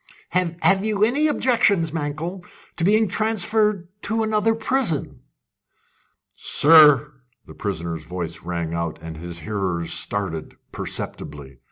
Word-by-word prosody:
"Have 180 +2 +2
you 210 -1 +1
any 275 +8 +3
objection, 230 - +2
Mankell, 160 +4 -4 0.3
to 165 - -3
being 215 +4 +4
transferred 210 -2 +1
to 225 +1 -1
another 220 +1 +1
prison?" 225 - -1 1.2
"Sir!" 150 -1 +6 0.3
the - - -12
prisoner's 85 -5 -4
voice 85 -2 -6
rang 85 -1 -4
out, 85 -1 -3
and 80 0 -8
his 85 +1 -7
hearers 95 -6 -2
started 90 -6 -3 0.2
perceptibly. 70 -3 -6
160 Hz, 115 wpm, -22 LUFS, -, 1.2 s, Sir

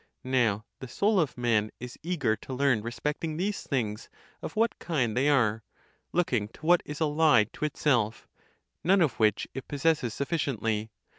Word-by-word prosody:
Now 120 -5 +1
the 130 - -7
soul 200 - +2
of 150 -8 0
man 115 -3 +1
is 125 0 -8
eager 150 -10 0
to 130 - -9
learn 130 -4 +2
respecting 150 +7 -3
these 200 +4 -1
things 110 -6 -3 0.3
of - - -6
what 225 +1 +1
kind 130 -10 -1
they 135 +4 +3
are, 115 -6 +2 0.5
looking 125 -12 +1
to 135 - -14
what 175 +1 +5
is 150 0 -6
allied 150 -8 +3
to - - -3
itself, 120 -7 0 0.6
none 190 +2 +4
of 150 -8 +1
which 110 -1 +2
it 135 - -7
possesses 145 -5 0
sufficiently. 115 -8 -1
135 Hz, 160 wpm, -28 LUFS, 115-155 Hz, 0.6 s, what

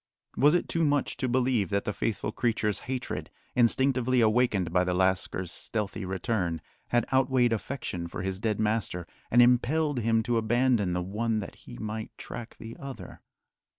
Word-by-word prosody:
Was 150 +4 +5
it 175 - 0
too 165 - 0
much 145 -2 +1
to 130 - -1
believe 125 -6 +2
that 100 0 0
the 105 - -1
faithful 110 0 -2
creature's 110 -3 0
hatred, 130 -1 -3 0.3
instinctively 125 +1 +3
awakened 110 -6 +2
by 90 0 +4
the 90 0 0
lascar's 95 -1 0
stealthy 105 -2 -3
return, 95 -3 -1 0.3
had 120 0 +2
outweighed 130 -2 +3
affection 110 -7 -4
for 85 - -6
his 95 0 -3
dead 110 -1 -1
master 105 -5 0 0.2
and 120 +1 +7
impelled 135 +4 +2
him 115 0 +2
to 120 -1 +1
abandon 115 -3 +2
the 90 0 -1
one 110 +4 -1
that 100 - -6
he - - -12
might 110 0 -5
track 120 -1 -8
the 115 +1 -9
other? 135 -1 -8
115 Hz, 165 wpm, -28 LUFS, 100-125 Hz, 0.3 s, and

